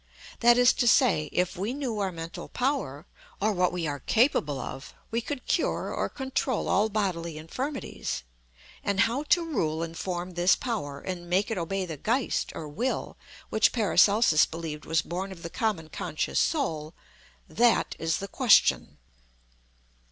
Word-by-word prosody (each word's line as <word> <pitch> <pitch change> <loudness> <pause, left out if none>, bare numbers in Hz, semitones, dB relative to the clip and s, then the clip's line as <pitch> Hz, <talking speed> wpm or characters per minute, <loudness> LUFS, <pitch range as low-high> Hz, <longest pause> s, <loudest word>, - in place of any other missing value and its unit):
That 240 +1 +6
is 245 0 +6
to 240 - +2
say, 195 - +4
if 180 +2 0
we 205 +8 -3
knew 255 -7 -3
our 195 -2 0
mental 165 -1 -7
power, 180 - -2 0.3
or 215 +2 +2
what 180 -1 +2
we 180 -2 -3
are 145 -2 -3
capable 150 - +2
of, 135 +2 -7 0.2
we 230 +1 0
could 255 +2 -5
cure - - 0
or - - -1
control 265 -2 -2
all 210 +3 +2
bodily 175 -6 -2
infirmities. 255 - -4 0.6
And 200 -1 +1
how 235 +5 +1
to 340 +3 +3
rule 165 - -1
and 165 0 -6
form 180 0 -4
this 175 +1 +3
power, 145 - -4
and 175 -2 -6
make 195 +5 +1
it 220 - -1
obey 190 +3 -2
the 160 -4 -6
Geist 235 - 0
or 155 - -6
Will 230 - -3 0.4
which 220 - +4
PARACELSUS 210 -6 +4
believed 160 -2 -6
was 160 -1 +1
born 185 +3 -4
of 170 -3 -10
the 170 - -6
common 205 -8 -1
conscious - - -2
Soul 160 - -1 0.5
that 240 0 +2
is 165 0 0
the 195 - -5
question. 245 0 +3
190 Hz, 160 wpm, -27 LUFS, 165-235 Hz, 0.6 s, That